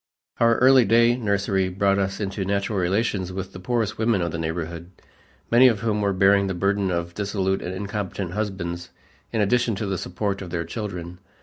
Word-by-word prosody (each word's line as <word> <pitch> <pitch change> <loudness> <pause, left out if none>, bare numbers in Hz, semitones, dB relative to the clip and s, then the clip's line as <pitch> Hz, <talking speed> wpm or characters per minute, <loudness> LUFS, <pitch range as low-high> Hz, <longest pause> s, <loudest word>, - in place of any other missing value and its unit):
Our 115 0 +4
early 130 0 +6
day 115 +3 +4
nursery 100 -4 0
brought 100 +1 +1
us 95 0 -1
into 100 -1 -3
natural 100 +1 -1
relations 95 0 0
with 95 0 -6
the 95 - -8
poorest 110 +1 -1
women 110 -5 +2
of 85 - -2
the 80 - -4
neighborhood, 85 +1 -4 0.6
many 120 +2 +7
of 110 -5 +1
whom 105 -2 0
were 100 -1 +1
bearing 100 +1 +4
the 95 - -2
burden 100 +1 +1
of 85 -1 -2
dissolute 95 -1 -1
and 90 +1 -5
incompetent 100 -2 -4
husbands 90 -4 -4 0.4
in 110 - 0
addition 120 +2 +2
to 105 - -3
the 95 -3 -2
support 100 +2 -3
of 95 - -7
their 85 -1 -3
children. 90 -2 -6
100 Hz, 190 wpm, -24 LUFS, 90-105 Hz, 0.6 s, many